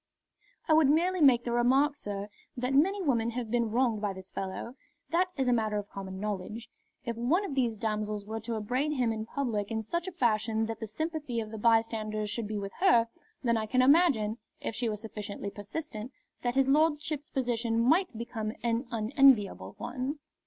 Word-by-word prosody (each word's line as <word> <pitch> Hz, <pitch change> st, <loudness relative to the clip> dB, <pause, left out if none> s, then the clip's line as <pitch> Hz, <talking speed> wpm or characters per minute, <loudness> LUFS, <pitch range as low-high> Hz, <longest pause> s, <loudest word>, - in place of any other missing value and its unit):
"I 315 Hz, -, +4 dB
would 310 Hz, -3 st, +5 dB
merely 350 Hz, +4 st, +2 dB
make 250 Hz, -5 st, +6 dB
the 240 Hz, -, -3 dB
remark, 265 Hz, +5 st, +3 dB
sir, 205 Hz, -4 st, -5 dB, 0.3 s
that 250 Hz, +2 st, -1 dB
many 380 Hz, +8 st, +3 dB
women 235 Hz, -7 st, +1 dB
have 235 Hz, -2 st, -4 dB
been 235 Hz, -2 st, +1 dB
wronged 230 Hz, -2 st, +1 dB
by 205 Hz, -2 st, -1 dB
this 190 Hz, 0 st, -11 dB
fellow. 195 Hz, +5 st, -5 dB, 0.4 s
That 355 Hz, +2 st, +3 dB
is 265 Hz, -2 st, +1 dB
a 245 Hz, -, +4 dB
matter 215 Hz, -2 st, +1 dB
of 205 Hz, -1 st, -5 dB
common 190 Hz, -1 st, -6 dB
knowledge. 210 Hz, +2 st, -4 dB, 0.3 s
If 235 Hz, -1 st, -2 dB
one 310 Hz, -, +2 dB
of 315 Hz, -, -4 dB
these 240 Hz, -5 st, 0 dB
damsels 210 Hz, -1 st, -2 dB
were 220 Hz, +1 st, -4 dB
to 225 Hz, +1 st, -4 dB
upbraid 255 Hz, +8 st, -1 dB
him 245 Hz, -5 st, +1 dB
in 220 Hz, 0 st, -5 dB
public 225 Hz, -8 st, -2 dB
in 220 Hz, -1 st, -2 dB
such 340 Hz, -, -3 dB
a -, -, -3 dB
fashion 225 Hz, -, +1 dB
that 225 Hz, 0 st, -5 dB
the 220 Hz, -, -5 dB
sympathy 300 Hz, 0 st, -3 dB
of 215 Hz, -1 st, -5 dB
the 220 Hz, -, -6 dB
bystanders 215 Hz, -2 st, +1 dB
should 220 Hz, 0 st, -2 dB
be 215 Hz, 0 st, -3 dB
with 200 Hz, -1 st, -5 dB
her, 235 Hz, -12 st, +5 dB, 0.3 s
then 235 Hz, -2 st, +2 dB
I 215 Hz, -1 st, -2 dB
can 255 Hz, +3 st, +3 dB
imagine, 260 Hz, -7 st, +4 dB, 0.2 s
if -, -, -4 dB
she 230 Hz, +1 st, -1 dB
were 210 Hz, -, -2 dB
sufficiently 205 Hz, -2 st, -6 dB
persistent, 215 Hz, +2 st, -6 dB, 0.3 s
that 245 Hz, 0 st, -1 dB
his 270 Hz, 0 st, +3 dB
lordship's 300 Hz, 0 st, +1 dB
position 235 Hz, -3 st, 0 dB
might 310 Hz, -, +3 dB
become 220 Hz, -2 st, -4 dB
an 235 Hz, +2 st, 0 dB
unenviable 220 Hz, -, +3 dB
one." 255 Hz, +4 st, -3 dB
235 Hz, 195 wpm, -30 LUFS, 215-270 Hz, 0.4 s, make